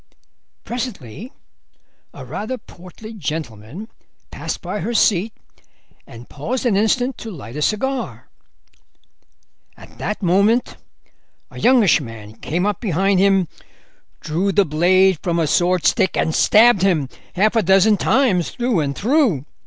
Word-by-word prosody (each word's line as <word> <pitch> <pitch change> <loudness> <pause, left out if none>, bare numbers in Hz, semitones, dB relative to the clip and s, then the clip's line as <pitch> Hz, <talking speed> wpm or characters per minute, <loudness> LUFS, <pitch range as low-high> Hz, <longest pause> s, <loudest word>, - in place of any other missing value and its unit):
"Presently 230 - -6 0.8
a - - -10
rather 220 +5 -5
portly 200 +3 -13
gentleman 150 - -6 0.4
passed - - -5
by 210 - -5
her 230 +7 -3
seat 210 0 +2 0.8
and 120 +1 -12
paused 240 - -4
an 230 -5 +2
instant 245 +5 +1
to 225 - -7
light 140 - -9
a 150 - -4
cigar. 255 - -2 1.5
At - - -16
that 210 - -4
moment 200 +7 +2 0.8
a - - -10
youngish 235 -9 +4
man 110 -4 -10
came 175 - -2
up 205 -3 -2
behind 195 -2 +1
him, 195 -2 +3 0.7
drew 180 +6 -1
the 200 0 +3
blade 180 +3 +3
from 170 -3 -1
a 165 - +1
swordstick, 175 +3 +1
and 160 - 0
stabbed 220 +1 +5
him 170 -8 +2 0.3
half 210 +5 +2
a 225 - +4
dozen 195 +3 +4
times 205 -7 +1
through 240 -6 -1
and 140 -2 -2
through. 230 - +1
195 Hz, 130 wpm, -19 LUFS, 165-220 Hz, 1.5 s, stabbed